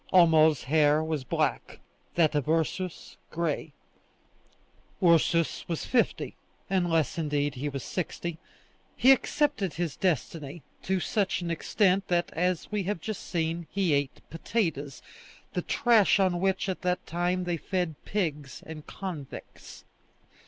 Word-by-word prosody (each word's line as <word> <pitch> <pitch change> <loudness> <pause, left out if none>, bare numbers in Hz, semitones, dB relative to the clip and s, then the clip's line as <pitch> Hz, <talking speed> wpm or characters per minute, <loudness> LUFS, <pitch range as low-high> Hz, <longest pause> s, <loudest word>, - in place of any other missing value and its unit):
Homo's 160 -5 +5
hair 150 +2 +3
was 155 -3 -2
black, - - -1 0.4
that 160 -3 +3
of 145 -1 -1
Ursus, 165 +2 -1
gray; 160 -2 -2 1.3
Ursus 170 -1 +3
was 165 -2 -3
fifty, 245 -3 0 0.4
unless, 170 -4 +1
indeed, 145 -2 0
he 140 +4 -3
was 140 -2 -5
sixty. 170 -1 -4 0.6
He 260 +3 +7
accepted 270 - +1
his 170 -4 -2
destiny, 160 -3 -2 0.2
to 190 0 0
such 195 0 0
an 170 - -2
extent 190 +3 +1
that, 175 -1 +1
as 180 +2 -1
we 210 -1 0
have 195 0 -2
just 215 +4 -5
seen, 165 0 -2
he 190 -5 +1
ate 140 -1 -2
potatoes, 160 - -2 0.5
the - - 0
trash 230 -6 +4
on 180 -2 +2
which 190 0 +1
at 190 - -3
that 180 -1 -1
time 175 +2 -1
they 175 -1 -1
fed 180 -1 -2
pigs 150 - -3
and 155 -2 -9
convicts. 170 -9 -8
170 Hz, 130 wpm, -28 LUFS, 155-185 Hz, 1.3 s, He